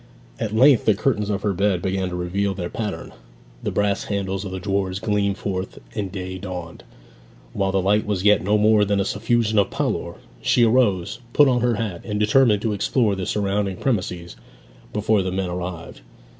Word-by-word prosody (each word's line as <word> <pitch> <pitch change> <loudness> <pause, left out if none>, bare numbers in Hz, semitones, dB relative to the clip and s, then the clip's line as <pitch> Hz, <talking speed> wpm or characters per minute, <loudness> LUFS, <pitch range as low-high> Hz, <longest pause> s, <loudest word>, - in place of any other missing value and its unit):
At 110 -1 -2
length 130 +1 +5
the 110 - +4
curtains 105 -2 0
of 100 -1 -2
her 105 - +1
bed 95 0 +1
began 95 -1 -1
to 90 - -5
reveal 95 +3 -1
their 90 -2 -5
pattern, 105 -3 -4 0.5
the - - -2
brass 100 -1 0
handles 95 -1 -2
of 95 - -6
the 95 - -4
drawers 95 0 -1
gleamed 100 -1 0
forth, 95 -1 -4 0.2
and 100 -3 -3
day 95 -1 -5
dawned. 90 -2 -7 0.7
While 95 -1 0
the 95 -1 0
light 105 +2 +2
was 100 -3 -1
yet 105 0 +5
no 105 +3 +2
more 105 0 +4
than 100 0 +1
a 100 - +1
suffusion 110 -1 +1
of 100 - +2
pallor, - - -2 0.3
she 120 - +3
arose, 110 -7 +2
put 145 - +6
on 125 -2 +2
her 120 -1 +2
hat, 105 -5 -4
and 105 -1 -3
determined 105 -1 +3
to 110 -2 0
explore 105 +2 +1
the 95 -1 -4
surrounding 100 -2 -1
premises 90 -8 -2 0.6
before 105 0 +1
the 95 0 -2
men 95 -1 -2
arrived. 90 -1 -6
100 Hz, 190 wpm, -22 LUFS, 95-105 Hz, 0.7 s, put